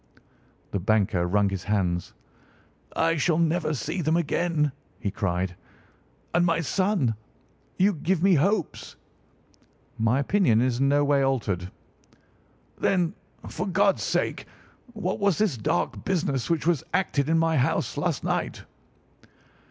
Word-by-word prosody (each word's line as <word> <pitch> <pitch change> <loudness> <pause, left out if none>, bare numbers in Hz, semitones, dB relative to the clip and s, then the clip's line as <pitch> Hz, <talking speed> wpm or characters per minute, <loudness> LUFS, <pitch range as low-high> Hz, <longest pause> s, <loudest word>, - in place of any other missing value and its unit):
The 100 - -1
banker 95 -3 +1
wrung 100 +2 +2
his 95 -1 -5
hands. 90 -4 -1 0.8
"I 165 0 +2
shall 155 +1 +2
never 165 -1 +1
see 160 +7 -3
them 160 +1 +2
again!" 165 -2 0 0.3
he 100 - -2
cried. 90 -3 -2 0.8
"And 175 - +3
my 165 -1 +2
son? 185 - +1 0.6
You 200 +2 +3
give 170 +2 -1
me 195 -1 +5
hopes?" 180 +3 0 1.0
"My 115 +3 +2
opinion 140 - +3
is 125 0 +1
in 135 0 +3
no 145 +1 +3
way 140 -1 +3
altered." 105 -10 -1 1.1
"Then, 180 -3 +1 0.3
for - - -4
God's - - +2
sake, - - -1 0.5
what 195 -4 -3
was 200 -4 +2
this 210 -9 +1
dark 95 -6 -1
business 145 -9 -1
which 165 -3 0
was 170 -5 +2
acted 150 -6 0
in 165 - +3
my 165 -1 +2
house 130 - 0
last - - -1
night?" - - -2
150 Hz, 135 wpm, -26 LUFS, 110-175 Hz, 1.1 s, me